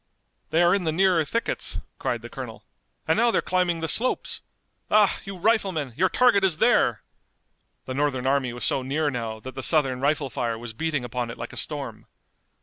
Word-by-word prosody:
"They 165 +2 +3
are 175 - +5
in 195 -2 +1
the 160 - +1
nearer 180 0 +3
thickets," 230 +10 -2 0.2
cried - - -2
the - - -6
colonel, - - -8 0.4
"and - - +3
now 235 +2 +4
they're - - +2
climbing 180 -2 +1
the 165 - -1
slopes! 245 +10 0 0.5
Ah, 210 -2 +4
you 195 -1 -6
riflemen, 185 - +1
your 185 - +2
target 245 -6 +4
is 180 -5 +2
there!" - - +3 0.8
The 130 - -4
Northern 135 -2 0
army 135 -2 +1
was 120 +1 -4
so 135 - +2
near 145 +3 0
now 115 -3 -4
that 130 +2 -8
the 130 - -5
Southern 135 -4 +2
rifle 145 -1 +1
fire 115 -2 -2
was 115 -1 -7
beating 145 0 -2
upon 120 0 -3
it 115 - -7
like - - -7
a - - -9
storm. - - -5
155 Hz, 195 wpm, -25 LUFS, 130-185 Hz, 0.8 s, are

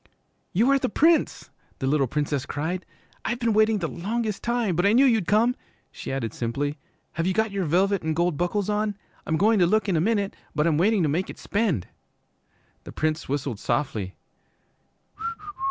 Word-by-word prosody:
'You 230 +9 +3
are 275 - +4
the - - -1
Prince,' 325 +9 +2 0.3
the - - -3
little 140 0 +2
Princess 145 0 -1
cried. 170 +5 -3 0.4
'I've 240 - -1
been 235 -2 +1
waiting 215 0 +4
the 170 -4 -2
longest 210 +5 -3
time, 235 -6 0
but 175 - +1
I 200 +2 +4
knew 260 +4 +6
you'd 225 -8 +3
come,' 230 +4 +3 0.4
she - - -7
added 135 -4 -3
simply. 140 +5 -2 0.3
'Have 165 +2 -2
you 185 - 0
got 220 -1 +1
your 195 -2 -1
velvet 190 +5 +2
an' 160 -1 -1
gold 170 0 +1
buckles 180 +5 -1
on? 210 -1 -1 0.3
I'm 160 - +1
goin' 215 +3 +4
to 175 - +5
look 215 +3 +2
in 190 - +1
a 155 - +2
minute, 205 0 0 0.2
but 150 - +2
I'm 160 -2 +2
waiting 200 +1 +3
to - - +2
make 165 +6 -1
it - - -8
spend.' 200 - 0 1.0
The - - -9
Prince 155 -2 -2
whistled 135 -6 -2
softly. 105 -11 -2
185 Hz, 185 wpm, -25 LUFS, 150-215 Hz, 1.0 s, knew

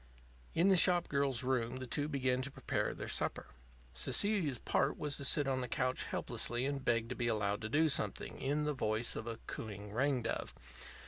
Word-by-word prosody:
In 175 +4 +4
the 190 - +6
shop 175 0 +5
girl's 140 -4 +1
room 125 -2 0
the 130 0 -5
two 145 +4 0
began 130 -3 0
to 135 - -4
prepare - - -2
their - - -6
supper. - - 0 0.5
Cecilia's 165 - +2
part 140 +5 0
was 150 -2 -2
to - - -5
sit 145 0 +3
on 130 -1 0
the 125 - -3
couch 130 +2 -1
helplessly 120 +2 -1
and 140 -1 -2
beg 115 -2 +1
to 125 - -3
be 120 - -1
allowed 105 -2 0
to 110 - -4
do 155 +6 +3
something, 145 - -2
in 145 +3 0
the 150 0 0
voice 115 -3 0
of 110 - -5
a 115 -1 -4
cooing 105 -2 -7
ring 130 +1 +1
dove. 115 - -3
130 Hz, 200 wpm, -35 LUFS, 115-145 Hz, 0.5 s, the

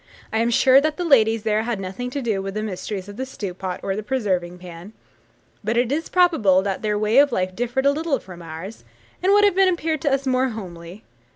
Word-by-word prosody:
I 220 - +1
am 230 +1 +2
sure 260 +3 +5
that 310 0 -1
the 355 - -2
ladies 225 -7 +4
there 215 -1 +1
had 230 -2 -3
nothing 195 +6 -5
to 275 +1 -4
do 215 -5 -1
with 195 +1 -6
the 215 - -2
mysteries 195 -1 -5
of 205 0 -10
the 260 - -3
stew 200 -8 -6
pot 185 0 -5
or 195 - -2
the 210 - -3
preserving 195 -7 -2
pan; 180 +3 -11 0.7
but 220 +3 -1
it 245 +1 +1
is 315 +3 -2
probable 260 - +3
that 195 -1 -3
their 210 -1 0
way 215 +5 +3
of 285 -1 +5
life 185 -4 -1
differed 245 +4 -1
a 280 - +5
little 305 -1 -1
from 180 -6 -12
ours, 170 +6 -9 0.4
and 375 - +3
would 415 +1 +5
have 405 -3 +4
appeared 335 -5 +2
to 290 - +1
us 275 0 0
more 260 0 +1
homely. 180 -3 -9
220 Hz, 230 wpm, -22 LUFS, 190-270 Hz, 0.7 s, sure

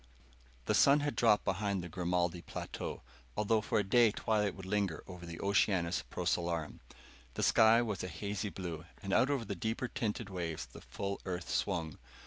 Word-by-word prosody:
] - - -28
The - - +1
sun 140 +1 +6
had 145 0 -1
dropped 105 -3 +4
behind 95 -1 0
the - - -5
Grimaldi 90 0 -1
plateau, - - -6 0.3
although 110 +1 +2
for - - 0
a 105 - +3
day 115 +4 +5
twilight 105 -2 0
would 95 - -9
linger 95 -5 -1
over 90 -2 -9
the 85 0 -7
Oceanus 95 -4 +2
Procellarum. 85 -3 -1 0.6
The - - -1
sky 115 +1 +6
was 105 -5 -3
a - - -2
hazy 100 +4 -3
blue, 85 -5 -6 0.2
and 95 0 -2
out 130 - +4
over 135 -5 0
the 100 - -3
deeper 110 +7 -2
tinted 115 -1 -2
waves 85 -4 -3
the - - -13
full 100 0 -4
Earth 90 -2 -4
swung. 85 -6 -1
95 Hz, 180 wpm, -33 LUFS, 85-110 Hz, 0.6 s, sun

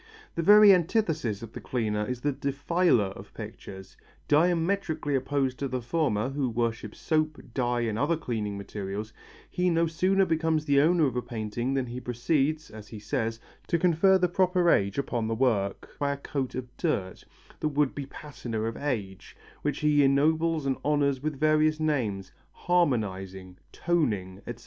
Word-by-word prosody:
The - - -2
very 205 +3 +8
antithesis 165 - 0
of 115 - -9
the - - -7
cleaner 105 -4 -1
is 125 -1 -4
the 145 - +1
defiler 140 - +1
of - - -12
pictures. 95 -1 -9 0.3
Diametrically 165 -1 +1
opposed 135 -1 0
to 140 - -1
the 130 0 -2
former, 125 -5 0
who 135 -2 -1
worships 115 -2 -3
soap, 155 -1 0
dye 120 -2 0
and 110 -2 -1
other 155 +4 +1
cleansing 110 -8 -3
materials, 100 +2 -6 0.3
he 180 0 0
no 165 0 +2
sooner 185 +4 +2
becomes 160 -2 0
the 140 -1 +4
owner 165 +1 +4
of 130 -3 -1
a 125 - 0
painting 120 +3 -3
than 135 -2 0
he 120 +1 -6
proceeds, 145 +5 -1
as 105 -1 -11
he 110 - -9
says, 110 +2 -2 0.3
to 170 - +2
confer 180 +3 +4
the 180 -1 +2
proper 180 -1 +2
age 100 0 +1
upon 120 -5 -1
the 115 - -1
work, 110 -6 -1
by 140 -1 +1
a - - -6
coat 140 -2 -4
of 125 -1 -6
dirt, 100 - -2 0.4
the - - 0
would 145 -2 +1
be 140 -2 -6
patina 120 -7 -6
of 115 0 -2
age, 105 -10 -4 0.2
which 145 -2 -2
he 150 -1 +4
ennobles 155 +3 +2
and 135 -1 0
honours 140 -3 +1
with 150 -2 -3
various 155 0 +3
names: 115 -12 -1 0.2
harmonizing, 95 - -1 0.2
toning, 105 - -1
etc. 120 -1 -6
140 Hz, 170 wpm, -27 LUFS, 115-160 Hz, 0.4 s, very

